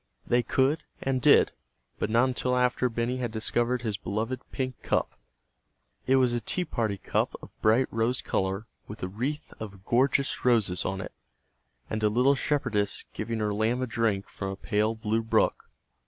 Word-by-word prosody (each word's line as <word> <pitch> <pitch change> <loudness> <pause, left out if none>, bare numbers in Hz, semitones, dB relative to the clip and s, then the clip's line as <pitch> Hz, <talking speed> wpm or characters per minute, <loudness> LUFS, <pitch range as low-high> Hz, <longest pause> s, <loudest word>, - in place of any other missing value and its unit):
They 120 +1 +3
could, 135 +6 +1 0.2
and 130 -1 0
did, - - +6 0.5
but - - -1
not 120 +4 +4
until 125 0 0
after 125 0 +2
Benny 120 +2 -1
had 120 -3 -2
discovered 120 +2 0
his 110 -4 -1
beloved 110 +6 -3
"pink 130 -2 -3
cup." - - 0 1.0
It 130 - +5
was 130 -2 +3
a 120 - -1
tea 180 - 0
party 110 -9 -1
cup - - -1
of - - -13
bright 115 +4 +4
rose 115 +3 +1
color 95 +3 -1 0.2
with 105 -1 -8
a - - 0
wreath 130 +10 -4
of 100 -3 -8
gorgeous 135 +3 +2
roses 110 -8 +2
on 95 -1 -2
it, - - -8 0.7
and 110 - -3
a 105 - +3
little 125 +6 +4
shepherdess 130 -8 0
giving 115 +1 -3
her 105 -1 0
lamb 110 +4 +1
a - - +1
drink 115 -5 0
from 95 - -5
a 95 - -4
pale 105 +2 0
blue 110 +1 0
brook. 115 - +1
115 Hz, 175 wpm, -28 LUFS, 105-125 Hz, 1.0 s, did